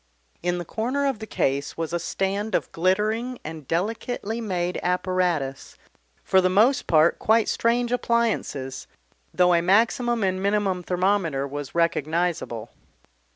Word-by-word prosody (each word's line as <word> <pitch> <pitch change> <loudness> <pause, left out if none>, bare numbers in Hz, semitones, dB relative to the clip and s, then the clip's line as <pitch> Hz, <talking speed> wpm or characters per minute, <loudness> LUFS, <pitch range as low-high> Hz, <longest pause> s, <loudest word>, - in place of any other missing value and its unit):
In 175 +1 0
the 175 - -5
corner 255 - -1
of 270 -6 -1
the 220 - -7
case 140 -5 -1
was 165 0 -3
a 175 - 0
stand 195 +5 -2
of - - -1
glittering 215 +8 0
and 155 -3 -8
delicately 220 +5 -2
made 180 -4 -2
apparatus, 180 -6 -1 0.5
for 190 - +4
the 185 - +2
most 225 +9 +3
part 160 +1 +4
quite 225 0 +3
strange 235 +1 +1
appliances, 230 - -1 0.4
though 180 0 +4
a 170 - +4
maximum 230 +5 +2
and 185 -1 0
minimum 200 -2 +1
thermometer 180 -6 0
was 145 +1 -7
recognisable. 165 -7 -1
185 Hz, 135 wpm, -24 LUFS, 170-220 Hz, 0.5 s, for